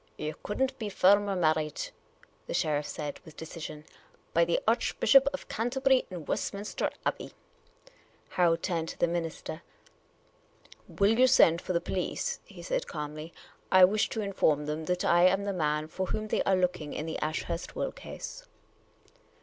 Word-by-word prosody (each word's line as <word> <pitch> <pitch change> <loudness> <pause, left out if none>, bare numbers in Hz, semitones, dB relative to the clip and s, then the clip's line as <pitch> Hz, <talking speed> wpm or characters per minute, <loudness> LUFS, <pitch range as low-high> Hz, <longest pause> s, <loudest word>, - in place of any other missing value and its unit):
" - - -36
You 155 - -2
could 210 - -5
n't 265 0 -2
be 215 -3 -3
firmer 200 +1 +4
married," 155 -3 0 0.6
the - - -3
sheriff 150 -1 0
said, 150 -3 -5
with 160 -4 -14
decision, 155 -2 -7 0.2
" - - -33
by 170 0 +4
the 170 - +1
Archbishop 275 - +4
of 280 - -7
Canterbury 260 +3 +1
in 175 -5 -7
Westminster 200 +6 -2 0.2
Abbey." - - -2 1.0
Harold 170 -2 +2
turned 165 -3 -1
to - - -7
the - - +3
minister. 165 -1 -4 1.3
"Will 210 +4 +2
you 255 - +7
send 170 -9 +5
for 185 - -3
the 170 - +2
police? 180 +1 -2
" - - -36
he - - -12
said, - - -2
calmly. 155 +1 -6 0.2
" - - -33
I 185 -1 +9
wish 205 +3 +1
to 220 - -3
inform 160 -7 +1
them 155 +1 -3
that 180 +2 -1
I 175 +1 +6
am 195 +2 +2
the 200 0 -2
man 150 -3 0
for 185 +4 -3
whom 215 +3 -3
they - - +1
are 195 - +4
looking 180 -5 -1
in 150 - -4
the 160 - -4
Ashurst 155 +2 -3
will - - -1
case." - - -9
180 Hz, 175 wpm, -29 LUFS, 155-205 Hz, 1.3 s, I